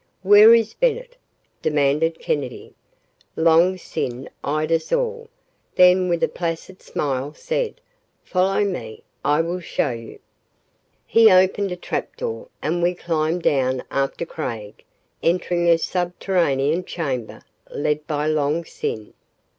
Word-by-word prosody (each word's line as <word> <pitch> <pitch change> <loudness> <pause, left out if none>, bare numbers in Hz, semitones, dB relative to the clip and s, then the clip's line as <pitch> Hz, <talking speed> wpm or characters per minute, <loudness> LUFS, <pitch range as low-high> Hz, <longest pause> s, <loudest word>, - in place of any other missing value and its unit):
"Where 205 +3 +8
is 225 -1 +1
Bennett?" - - -1 0.5
demanded 150 +2 +1
Kennedy. 135 -4 -4 0.6
Long 165 +3 +4
Sin 130 -7 -5
eyed 155 +2 -1
us 165 -1 0
all, 470 -2 -1 0.5
then 180 0 +5
with 170 -1 0
a - - +4
placid 170 +2 -5
smile, 140 +1 -3
said, - - -3 0.4
"Follow 190 +2 +1
me. 120 - -5 0.2
I 145 +2 +3
will 170 +2 -3
show 170 - -1
you." 115 -1 -8 0.9
He 225 -1 +6
opened 185 +1 +3
a - - -2
trap 180 - -5
door, 485 +1 -5 0.2
and 175 +3 0
we 175 +1 +1
climbed 165 0 -1
down 130 -2 +1
after 140 +4 -1
Craig, 115 -11 -6 0.4
entering 175 0 +1
a 165 - +6
subterranean 175 -3 0
chamber, 135 -10 -4 0.3
led 150 +1 -2
by 150 -2 -1
Long 155 +2 0
Sin. 110 -7 -5
170 Hz, 125 wpm, -22 LUFS, 145-185 Hz, 0.9 s, Where